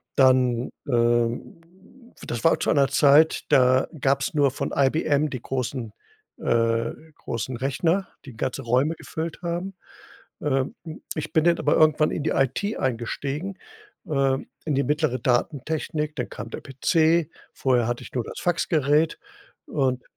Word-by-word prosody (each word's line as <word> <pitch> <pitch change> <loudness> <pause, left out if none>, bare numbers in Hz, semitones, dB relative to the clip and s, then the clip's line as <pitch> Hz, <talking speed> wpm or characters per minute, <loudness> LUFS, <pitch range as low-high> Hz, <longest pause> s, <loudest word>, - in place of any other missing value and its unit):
dann, 130 -2 +3 0.2
ähm 120 +3 +1 0.6
das 120 -1 -4
war 165 - +5
zu - - 0
einer 140 -2 +4
Zeit, 150 +3 +4
da 130 0 +4
gab's 135 +3 +1
nur 145 -2 +3
von 135 - -4
IBM 145 +1 +2
die 130 -5 -6
großen 125 -3 -3 0.5
äh, 115 0 +1 0.2
großen 120 +1 -4
Rechner, 165 +9 0 0.2
die 135 - -10
ganze 130 +3 -2
Räume 130 +7 +1
gefüllt 160 +1 -6
haben. 175 +2 -3 0.7
Ähm, 135 -2 0 0.4
ich 155 - -5
bin 160 - +3
dann 170 0 +3
aber - - +2
irgendwann 155 -1 +4
in 150 - -3
die 155 - +1
IT 135 - 0
eingestiegen, 140 - -3 0.5
ähm, 135 -3 0 0.2
in 155 - -1
die 140 - +3
mittlere 150 -3 0
Datentechnik. 150 +5 -1
Dann 125 - -3
kam 115 - -7
der - - -6
PC, 160 +4 +2 0.2
vorher 125 -3 +1
hatte 120 0 -3
ich - - -12
nur 125 -3 -1
das - - -8
Faxgerät. 155 -3 +1 0.5
Und 130 - 0
140 Hz, 145 wpm, -24 LUFS, 125-155 Hz, 0.7 s, war